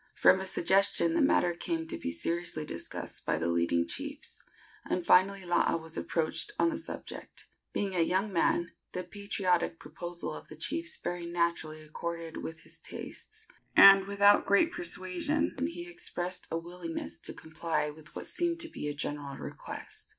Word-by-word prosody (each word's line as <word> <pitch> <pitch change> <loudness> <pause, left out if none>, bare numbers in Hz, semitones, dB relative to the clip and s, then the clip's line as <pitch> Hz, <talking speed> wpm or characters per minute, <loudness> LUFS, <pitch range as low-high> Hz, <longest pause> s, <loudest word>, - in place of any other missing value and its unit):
From 185 - +6
a 190 - -3
suggestion 195 - +3
the 335 - +3
matter 180 -10 +4
came 165 -1 -2
to 160 - -3
be - - -3
seriously 155 - -1
discussed 85 -11 -6
by - - +1
the 80 - -1
leading 85 0 +2
chiefs, 85 - -4 0.4
and 180 -1 -2
finally 190 +1 +5
Laa 175 -1 +3
was 160 0 -9
approached 165 - -1
on 335 - +4
the 315 - -2
subject. 325 - -8 0.3
Being 195 -2 -1
a - - +2
young 190 +5 +1
man, 170 0 +2 0.2
the 180 - -2
patriotic 180 -3 0
proposal 170 +3 -6
of - - -9
the 155 - -10
chiefs 320 - 0
very 175 -1 -4
naturally 170 -2 -1
accorded 165 +1 -5
with 160 0 -6
his - - -8
tastes, 440 +1 -7 0.3
and, 195 0 +10
without 200 0 +5
great 255 +12 +4
persuasion, 295 - -2
he 345 +1 -6
expressed 185 - -4
a 165 - -1
willingness 170 0 -5
to - - -6
comply 160 -1 -2
with 155 +1 -14
what - - -6
seemed 340 -1 0
to 330 - -6
be 150 - -5
a 145 - -2
general 145 -1 -4
request. - - -7
175 Hz, 165 wpm, -31 LUFS, 160-200 Hz, 0.4 s, and